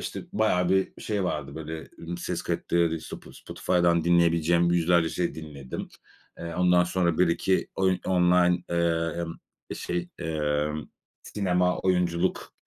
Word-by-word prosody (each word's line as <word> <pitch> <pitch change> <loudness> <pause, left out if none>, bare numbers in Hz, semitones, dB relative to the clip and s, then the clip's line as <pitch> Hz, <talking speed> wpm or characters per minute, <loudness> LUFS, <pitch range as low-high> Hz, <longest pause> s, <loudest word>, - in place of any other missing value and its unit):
işte, - - -5
bayağı 90 -5 +2
bir 95 0 0
şey 105 -3 -1
vardı, 75 -5 -3
böyle, 80 0 -7
ımm, 85 +1 -6
ses - - -3
kayıtları. 85 -1 0
Spo - - -10
Spotify'dan 85 -2 0
dinleyebileceğim 85 0 +3
yüzlerce 85 -1 +3
şey 85 0 -2
dinledim. 75 -5 -7 0.5
Eee, 85 0 -6
ondan 90 0 +4
sonra 85 -2 0
1-2 90 +1 +2
oyun 95 -1 +2
online, 90 -1 +3
emm, 85 0 -1 0.4
şey, 85 0 -3
emm, 75 -2 -1 0.4
sinema, 90 -3 0
oyunculuk 90 -1 0
85 Hz, 125 wpm, -26 LUFS, 80-90 Hz, 0.5 s, ondan